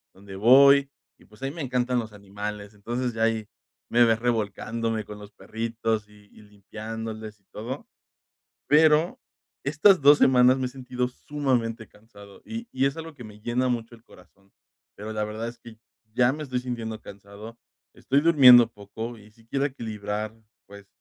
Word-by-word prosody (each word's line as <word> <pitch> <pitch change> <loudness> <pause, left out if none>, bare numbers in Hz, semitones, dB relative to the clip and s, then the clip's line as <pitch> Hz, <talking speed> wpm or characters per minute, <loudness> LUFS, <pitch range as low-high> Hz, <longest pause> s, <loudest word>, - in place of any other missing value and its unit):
donde 95 0 -12
voy, 140 +5 +6 0.3
y - - -22
pues, 105 +2 -21
a - - -1
mí 135 - -2
me 165 - -7
encantan 125 -2 0
los 110 -2 -6
animales, 105 +1 -7
entonces, 120 +4 -3
ya 110 0 -1
ahí 110 -1 0 0.4
me 120 0 +5
ves, 115 -1 +2
revolcándome 115 -1 -2
con 105 0 -10
los 105 0 -12
perritos, 115 -1 -3
y 105 -1 -20
y - - -17
limpiándoles, 110 +1 -8
y - - -43
todo, 125 +6 -7 0.8
pero, 155 - +4 0.4
estas 155 +7 +4
2 145 +1 +7
semanas 125 0 +5
me 130 - -1
he - - -3
sentido 125 -1 -4
sumamente 125 -5 -2
cansado, 100 -2 -17
y 230 +1 -6
y 130 +1 +1
es 140 - -2
algo, 165 -1 -8
que 125 -4 -11
me 105 -1 -13
llena 120 +3 -1
mucho 120 -1 -3
el 115 - -18
corazón, 95 +2 -21 0.4
pero, 105 +2 -7
la 105 0 -1
verdad 110 +2 -5
es 120 - -10
que, 115 -1 -14 0.4
ya 125 +1 +3
me 155 - -6
estoy 130 -4 -3
sintiendo 115 -3 -5
cansado, 100 +4 -12 0.4
estoy 140 +2 +1
durmiendo 130 -7 +8
poco, 110 +3 -8
y 105 0 -17
sí 115 +1 -24
quiero 135 +2 0
equilibrar, 110 -4 -5 0.3
pues, 100 0 -13
115 Hz, 175 wpm, -25 LUFS, 105-130 Hz, 0.8 s, durmiendo